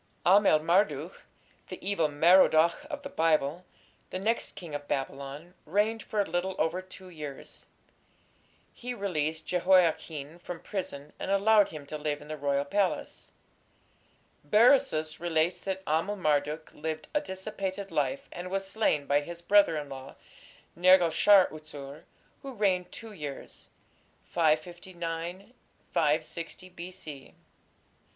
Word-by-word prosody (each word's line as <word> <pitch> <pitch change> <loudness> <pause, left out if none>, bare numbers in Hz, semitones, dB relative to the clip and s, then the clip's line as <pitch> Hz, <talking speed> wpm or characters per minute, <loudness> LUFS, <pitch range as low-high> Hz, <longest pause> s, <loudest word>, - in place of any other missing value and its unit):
Amel 195 -3 +6
Marduk, 165 -1 0 0.4
the - - -7
"Evil 195 -6 +2
Merodach" 170 - +4
of 290 -2 -6
the 280 - -6
Bible, 160 - +1 0.4
the - - -4
next 220 +5 -1
king 170 -5 -9
of 145 0 -5
Babylon, 140 +4 -4
reigned 210 +6 0
for 215 - -4
a 200 - +3
little 175 +2 -2
over 170 +3 0
two 185 0 -13
years. 150 -5 -8 1.1
He 245 0 -6
released 160 -6 -2
Jehoiachin 170 -4 +1
from 175 -1 -7
prison, 150 -8 -6
and - - -4
allowed 205 +1 +4
him 150 -2 -9
to 155 +2 -6
live 150 -1 -2
in 150 - -13
the 155 - -3
royal 140 -1 0
palace. 195 +5 -2 1.1
Berosus 210 - +3
relates 170 0 0
that 190 -1 -4
Amel 165 +7 0
Marduk 150 -3 -1
lived 155 0 -5
a 295 - +2
dissipated 190 -3 -5
life, 140 -2 -1
and 180 +1 -6
was 195 +1 -2
slain 195 -8 +1
by 145 +1 +2
his 170 +3 -9
brother 200 -4 +5
in 150 -1 -4
law, 135 -1 -9 0.6
Nergal 180 0 +6
shar 195 +3 +6
utsur, 150 -1 -10 0.4
who 270 -1 -7
reigned 190 -5 0
two 225 -1 -9
years 150 -8 -8 0.5
(559 170 +4 -2 0.7
6 165 +1 -7 0.2
B.C.). 170 -6 -9
170 Hz, 130 wpm, -29 LUFS, 150-190 Hz, 1.1 s, Amel